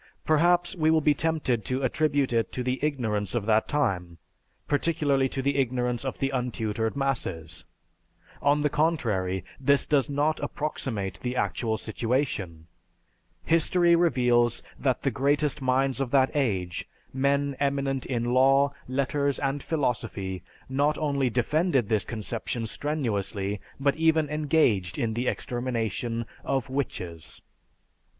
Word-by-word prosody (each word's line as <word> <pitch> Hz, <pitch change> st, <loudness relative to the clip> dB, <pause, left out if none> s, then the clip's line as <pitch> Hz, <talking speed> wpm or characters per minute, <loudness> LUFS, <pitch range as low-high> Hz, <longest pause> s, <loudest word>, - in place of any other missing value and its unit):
Perhaps 175 Hz, +4 st, +3 dB
we 155 Hz, -3 st, +2 dB
will 160 Hz, 0 st, +5 dB
be 150 Hz, -1 st, +3 dB
tempted 145 Hz, -7 st, 0 dB
to 130 Hz, +1 st, -1 dB
attribute 140 Hz, -1 st, +1 dB
it 115 Hz, -4 st, +1 dB
to 125 Hz, -, -2 dB
the 125 Hz, +1 st, -1 dB
ignorance 110 Hz, -9 st, -1 dB
of 115 Hz, -4 st, -1 dB
that 110 Hz, 0 st, +3 dB
time, 95 Hz, -, -1 dB, 0.5 s
particularly 145 Hz, -3 st, +1 dB
to 135 Hz, 0 st, -3 dB
the 140 Hz, +1 st, +1 dB
ignorance 125 Hz, -2 st, 0 dB
of 130 Hz, -, -3 dB
the 135 Hz, 0 st, -1 dB
untutored 115 Hz, -3 st, -2 dB
masses. 120 Hz, -, -3 dB, 0.8 s
On 145 Hz, +1 st, +3 dB
the 150 Hz, -, +3 dB
contrary, 115 Hz, -, 0 dB
this 140 Hz, +1 st, +3 dB
does 145 Hz, -1 st, +2 dB
not 145 Hz, +2 st, +1 dB
approximate 115 Hz, -9 st, -3 dB
the 125 Hz, 0 st, -3 dB
actual 110 Hz, -3 st, -1 dB
situation. 110 Hz, -, -2 dB, 0.8 s
History 170 Hz, +1 st, +4 dB
reveals 125 Hz, -8 st, +2 dB, 0.2 s
that 130 Hz, -3 st, 0 dB
the 135 Hz, -, +1 dB
greatest 145 Hz, +4 st, +1 dB
minds 130 Hz, +1 st, +1 dB
of 135 Hz, -, -1 dB
that 135 Hz, 0 st, +3 dB
age, 95 Hz, -11 st, -1 dB, 0.2 s
men 140 Hz, +1 st, +1 dB
eminent 140 Hz, -1 st, 0 dB
in 120 Hz, -3 st, -1 dB
law, 135 Hz, +2 st, +4 dB
letters, 140 Hz, +2 st, 0 dB
and 140 Hz, 0 st, -1 dB
philosophy, 115 Hz, -, -2 dB, 0.3 s
not 145 Hz, +3 st, +1 dB
only 140 Hz, -4 st, +1 dB
defended 130 Hz, -, +1 dB
this 110 Hz, -2 st, +1 dB
conception 115 Hz, +1 st, -4 dB
strenuously, 105 Hz, -8 st, -2 dB, 0.2 s
but 140 Hz, 0 st, +2 dB
even 160 Hz, -2 st, +3 dB
engaged 145 Hz, -, +2 dB
in 115 Hz, -1 st, -1 dB
the 120 Hz, +3 st, -2 dB
extermination 115 Hz, -1 st, -2 dB, 0.2 s
of 135 Hz, -2 st, -1 dB
"witches." 90 Hz, -, -4 dB
130 Hz, 130 wpm, -27 LUFS, 115-145 Hz, 0.8 s, will